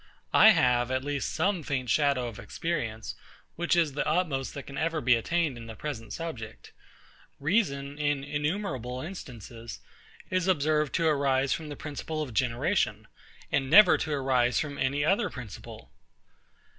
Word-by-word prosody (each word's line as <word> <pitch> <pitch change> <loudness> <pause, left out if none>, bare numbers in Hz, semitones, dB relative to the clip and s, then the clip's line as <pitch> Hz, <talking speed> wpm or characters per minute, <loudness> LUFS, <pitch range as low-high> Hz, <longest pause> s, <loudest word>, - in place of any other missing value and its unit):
I 220 - +9
have 125 - +3
at 130 0 -1
least 145 -1 -2
some 195 -3 0
faint 130 -5 -2
shadow 140 -4 +2
of 115 -3 -8
experience, 120 -10 -3 0.4
which 175 +1 +1
is 165 -5 +2
the 145 - -1
utmost 155 -5 0
that 140 - -5
can 140 - -10
ever 165 +1 0
be 125 -3 +4
attained 150 +3 0
in 115 -1 -9
the 110 - -8
present 120 -4 -6
subject. 115 - -7 0.7
Reason, 145 -5 0
in 145 -2 0
innumerable 145 - -2
instances, 120 - -8 0.5
is 185 -1 +1
observed 155 -4 +2
to 165 - +1
arise 140 -3 +2
from 155 -2 -5
the 145 - -6
principle 155 +2 -4
of 130 -6 -8
generation, 120 - 0 0.4
and 135 -1 +1
never 210 +7 +8
to 155 - -3
arise 130 -4 +2
from 145 -2 -4
any 140 +2 +1
other 200 +6 +2
principle. 115 - -10
140 Hz, 155 wpm, -28 LUFS, 125-160 Hz, 0.7 s, I